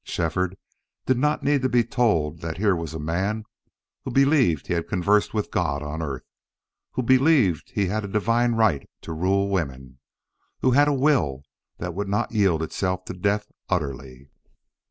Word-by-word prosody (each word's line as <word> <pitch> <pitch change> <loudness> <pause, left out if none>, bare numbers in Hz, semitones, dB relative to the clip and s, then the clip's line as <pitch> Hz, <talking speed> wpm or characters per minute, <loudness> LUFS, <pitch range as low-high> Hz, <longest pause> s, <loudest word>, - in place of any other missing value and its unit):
Shefford 90 +3 -2 0.5
did 130 -1 +2
not 150 +3 +1
need 145 -1 +2
to 130 - +1
be 120 -1 +3
told 85 - 0
that 80 -1 -4
here 100 -1 +2
was 80 -2 -5
a - - -4
man 95 +8 -1 0.6
who - - -5
believed 135 - +3
he - - -2
had 85 -1 -2
conversed 100 +2 +2
with 105 -2 -2
God 70 +1 -1
on 75 +2 -4
earth, 70 -5 -4 0.7
who 130 - -1
believed 130 - +3
he 100 - +2
had 105 +3 -1
a - - -4
divine 115 +4 +1
right 110 -11 +1
to 80 - -6
rule 95 +4 +1
women, 65 -9 -3 0.6
who 130 - +3
had 145 +3 +5
a - - +3
will 130 - +1 0.3
that 90 0 -5
would 100 +3 -3
not 100 - 0
yield 95 -7 +2
itself 90 +3 -2
to - - -6
death 100 +3 0 0.2
utterly. 70 -6 -4
95 Hz, 175 wpm, -24 LUFS, 80-115 Hz, 0.7 s, had